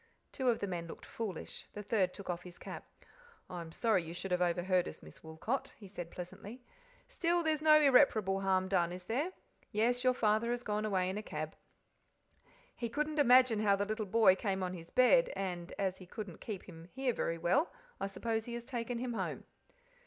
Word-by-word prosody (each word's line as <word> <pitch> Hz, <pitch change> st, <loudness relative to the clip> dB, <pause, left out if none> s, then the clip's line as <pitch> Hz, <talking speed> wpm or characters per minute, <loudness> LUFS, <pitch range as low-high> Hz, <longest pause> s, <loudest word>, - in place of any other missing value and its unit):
Two 260 Hz, -2 st, 0 dB
of 235 Hz, -, +3 dB
the -, -, -2 dB
men 175 Hz, -3 st, -4 dB
looked -, -, -9 dB
foolish, 210 Hz, -7 st, -6 dB
the 210 Hz, -, -6 dB
third 195 Hz, -4 st, +1 dB
took 200 Hz, -, -10 dB
off 175 Hz, -1 st, -2 dB
his 180 Hz, -1 st, -11 dB
cap. -, -, -8 dB, 0.7 s
"I 175 Hz, -1 st, -4 dB
am 165 Hz, -1 st, -9 dB
sorry 215 Hz, +1 st, +2 dB
you 165 Hz, +1 st, -7 dB
should 185 Hz, +2 st, -5 dB
have 180 Hz, 0 st, +2 dB
overheard 180 Hz, +1 st, +2 dB
us, -, -, -9 dB
Miss -, -, -13 dB
Woolcot," 160 Hz, +12 st, -3 dB
he 205 Hz, -, -11 dB
said 175 Hz, -3 st, -7 dB
pleasantly. 190 Hz, +7 st, -8 dB, 0.5 s
"Still, 345 Hz, -8 st, +1 dB
there 315 Hz, -1 st, +3 dB
is 305 Hz, -, -3 dB
no 305 Hz, 0 st, +7 dB
irreparable 250 Hz, -9 st, +5 dB
harm 190 Hz, -1 st, +2 dB
done, 175 Hz, -3 st, +2 dB
is 180 Hz, 0 st, -7 dB
there? 270 Hz, -, -1 dB, 0.4 s
Yes, 240 Hz, +3 st, +1 dB
your 255 Hz, -1 st, +4 dB
father 220 Hz, +1 st, +2 dB
has 240 Hz, 0 st, -1 dB
gone 210 Hz, -1 st, -1 dB
away 190 Hz, -3 st, +1 dB
in 190 Hz, +3 st, -2 dB
a -, -, -4 dB
cab. 155 Hz, -6 st, -5 dB, 1.2 s
He 235 Hz, -, -3 dB
couldn't 300 Hz, +4 st, -1 dB
imagine 250 Hz, -4 st, +6 dB
how 205 Hz, -2 st, +4 dB
the 200 Hz, +1 st, -1 dB
little 215 Hz, 0 st, -3 dB
boy 205 Hz, -2 st, +6 dB
came 190 Hz, -1 st, -1 dB
on 180 Hz, 0 st, -2 dB
his 165 Hz, -2 st, -9 dB
bed, -, -, +5 dB
and, 180 Hz, -2 st, -4 dB
as 190 Hz, -2 st, -1 dB
he 185 Hz, -, -11 dB
couldn't 200 Hz, -3 st, -7 dB
keep 205 Hz, -5 st, -5 dB
him 165 Hz, 0 st, -11 dB
here 265 Hz, -2 st, 0 dB
very 165 Hz, -6 st, -1 dB
well, 180 Hz, -, +2 dB, 0.3 s
I 195 Hz, -, -1 dB
suppose 220 Hz, +3 st, -2 dB
he 235 Hz, -, -5 dB
has 235 Hz, 0 st, -6 dB
taken 240 Hz, -2 st, -3 dB
him 245 Hz, 0 st, -3 dB
home." -, -, -3 dB
210 Hz, 210 wpm, -34 LUFS, 180-240 Hz, 1.2 s, no